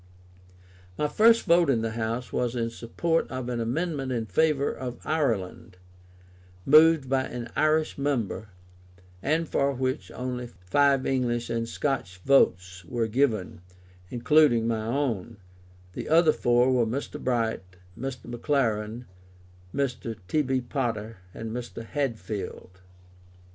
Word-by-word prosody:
My 150 - +1
first 225 +9 +5
vote 170 -3 +4
in 115 -4 +2
the 115 - -1
House 115 +2 -3
was 125 0 -1
in 115 -1 -1
support 160 +9 -1
of 130 -1 -4
an 120 -1 -2
amendment 135 +3 -2
in 115 -3 -1
favour 140 - +2
of 125 -1 -6
Ireland, 115 - -1 0.9
moved 155 0 +6
by 130 0 +1
an 120 -1 -6
Irish 155 -1 +1
member, 120 -7 -1 0.7
and 160 +6 0
for 140 -1 +1
which 130 0 -2
only 125 -1 -4
five 130 +8 +1
English 120 -3 0
and 115 0 -2
Scotch 135 -12 -2
votes 90 -9 +3
were 115 +6 -1
given, 110 -6 0 0.5
including 125 -2 +3
my 110 -2 -1
own: 120 -5 -2 0.6
the - - -6
other 160 0 +5
four 120 +1 +3
were 120 -3 +2
Mr. 130 +6 -4
Bright, 115 -4 0 0.3
Mr. 130 -2 -6
McLaren, 120 -3 -1 0.7
Mr. 125 -4 -2
T.B. 135 0 +1
Potter, 115 -4 -3
and 110 +4 -6
Mr. 120 -1 -6
Hadfield. 110 -8 -4
125 Hz, 125 wpm, -27 LUFS, 115-140 Hz, 0.9 s, moved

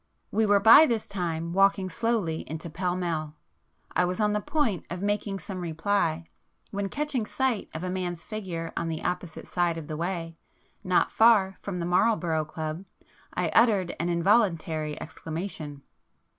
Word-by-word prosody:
[p - - -6
112]We 220 - +4
were 205 0 +5
by 260 +10 +9
this 230 -3 -1
time 170 -3 -3
walking 195 0 +3
slowly 195 -4 -1
into 160 +1 -5
Pall 180 +2 -1
Mall,—I 165 0 -4
was 180 +2 -1
on 210 -1 +2
the 210 - 0
point 235 - 0
of 175 +2 -5
making 205 -1 -1
some 190 0 -6
reply, 165 0 0 0.5
when 200 -1 -2
catching 290 -3 -1
sight 260 -6 -1
of 160 - -4
a 185 - -2
man's 175 -2 -3
figure 180 -7 -5
on - - -2
the 160 -1 -4
opposite 180 -2 -3
side 175 -2 0
of 160 - -6
the 155 - -4
way, 165 0 -3 0.5
not 185 -1 +2
far 210 -4 +4
from 195 -3 -4
the 170 - -2
Marlborough 175 -4 +2
Club, 155 +2 -5 0.5
I - - 0
uttered 205 -6 +3
an 170 - 0
involuntary 170 -5 +1
exclamation. 155 -3 -6
180 Hz, 160 wpm, -27 LUFS, 165-205 Hz, 0.5 s, by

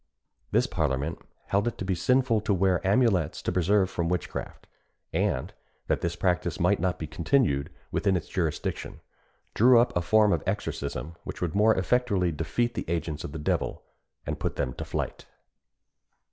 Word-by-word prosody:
This - - +3
parliament 75 +1 -1 0.3
held 100 +3 +1
it 120 - -2
to 95 - -4
be 95 - +1
sinful 120 +5 +2
to 100 -1 +1
wear 95 -1 +2
amulets 100 - +2
to - - 0
preserve 95 +2 +3
from 85 -2 -2
witchcraft; 90 -2 -4 0.5
and 65 - 0 0.3
that - - 0
this 85 0 -1
practice 90 -3 0
might - - +3
not 90 +1 0
be 80 - -4
continued 80 - +1 0.2
within 95 -2 +2
its 80 -3 -6
jurisdiction, 85 -5 -3 0.5
drew 120 +2 +6
up 120 +1 +2
a 90 - +2
form 105 +3 +4
of 80 - 0
exorcism, 70 +3 -3
which - - -7
would 85 -3 -2
more 110 +2 +4
effectually 95 -3 +1
defeat 80 +11 -1
the - - -4
agents 80 -3 -2
of - - -6
the 80 - -6
devil, 75 - -1 0.4
and - - -3
put - - -2
them 65 - -2
to - - -6
flight. - - -4
90 Hz, 170 wpm, -27 LUFS, 80-105 Hz, 0.5 s, drew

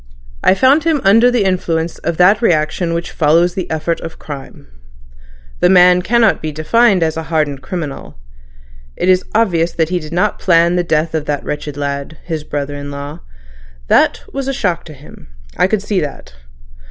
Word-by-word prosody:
I - - +4
found 270 +7 +4
him 320 -2 +1
under 225 +5 +5
the 245 -4 +1
influence 170 -3 -1
of 170 0 -3
that 195 +5 +4
reaction 165 -2 0
which 170 +1 -4
follows 165 +3 +2
the 185 - -4
effort 160 +1 -2
of 165 - -8
crime. 140 -3 -10 0.9
The 180 - +3
man 180 -1 +6
cannot 225 +2 +2
be 155 - -4
defined 185 +5 +2
as 160 0 -1
a - - -2
hardened 150 -4 -1
criminal. 155 - -6 0.8
It 185 - -1
is 185 0 +4
obvious 175 -7 +1
that 160 -1 0
he 180 0 -1
did 155 -1 -10
not 180 +5 0
plan 170 -1 +3
the 180 - +1
death 160 -1 0
of 155 -2 -2
that 145 -1 -2
wretched 150 -1 -5
lad—his 145 +3 -5
brother 145 -1 -4
in 145 0 -7
law. 140 +1 -7 0.7
That - - +3
was 275 -1 -4
a 275 - -1
shock 180 -9 -2
to 155 - -11
him—I - - -5
could 200 0 -1
see 205 -3 -1
that. 145 - -7
170 Hz, 180 wpm, -16 LUFS, 150-190 Hz, 0.9 s, man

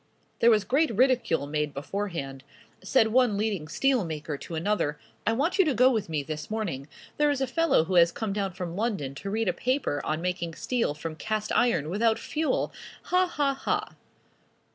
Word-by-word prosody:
There 235 - +6
was 215 -3 +4
great 300 +8 +2
ridicule 240 - +2
made 150 0 -2
beforehand. 145 -4 -4 0.4
Said 225 -4 +3
one 240 -3 +3
leading 205 -7 -1
steel 260 - +1
maker 155 -2 -4
to 165 +4 -7
another. 160 -4 0 0.3
"I 225 - +4
want 305 - 0
you 385 - +6
to 295 -5 +1
go 255 +3 +5
with 220 -8 -1
me 150 -3 -1
this 150 +1 -6
morning. 185 -11 -3 0.3
There 295 0 +3
is 285 -2 0
a 265 - +1
fellow 330 - +2
who 180 +3 -4
has 170 -1 +6
come 215 0 -3
down 195 -2 -2
from 175 -2 -5
London 195 - -2
to 195 +8 -6
read 220 +1 -1
a 180 - +2
paper 250 - -1
on 155 - -1
making 175 -2 -3
steel 235 -12 -1
from 160 +1 -6
cast 215 +2 -2
iron 235 -12 +2
without 220 +3 +2
fuel! 315 0 -1 0.3
Ha! 365 0 +2
ha! 290 -5 0
ha!" 270 - -2
205 Hz, 190 wpm, -27 LUFS, 160-250 Hz, 0.4 s, There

